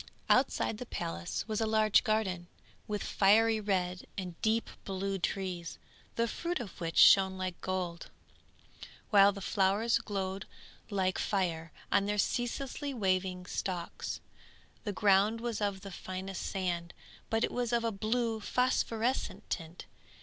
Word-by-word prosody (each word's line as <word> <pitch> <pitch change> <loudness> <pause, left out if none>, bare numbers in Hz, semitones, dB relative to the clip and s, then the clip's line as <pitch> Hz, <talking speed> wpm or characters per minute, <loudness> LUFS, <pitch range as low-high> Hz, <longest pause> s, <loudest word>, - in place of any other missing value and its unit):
_] - - -14 0.3
Outside 215 - +2
the 250 - -6
palace 85 - -4
was 215 0 -1
a 220 - +1
large 215 -1 +4
garden, 190 -5 0 0.4
with 210 -1 -2
fiery 220 +3 +4
red 185 -3 -1
and 185 -3 -4
deep 220 +1 +2 0.2
blue 195 0 -2
trees, 180 -2 -3 0.4
the 230 0 +1
fruit 340 +9 -2
of 205 -7 -8
which 165 -1 -3
shone 190 -1 +7
like 185 -2 -4
gold, 180 -2 -3 1.0
while 200 -1 +7
the 200 0 -8
flowers 200 +5 +2
glowed 195 -1 -3 0.4
like 190 -3 0
fire 165 -5 -1 0.2
on 200 - +3
their 210 0 0
ceaselessly 265 +6 -1
waving 185 -3 0
stalks. 180 -2 -4 0.6
The 205 - -1
ground 205 +1 +3
was 230 -2 -3
of 200 -2 -1
the 195 - -8
finest 185 +1 -5
sand, 175 -3 -2 0.3
but 225 0 +1
it - - +1
was 245 -1 -1
of 235 -1 +2
a 230 - +1
blue 225 +2 0
phosphorescent 250 +1 0
tint. 165 +1 -4
200 Hz, 140 wpm, -32 LUFS, 185-220 Hz, 1.0 s, shone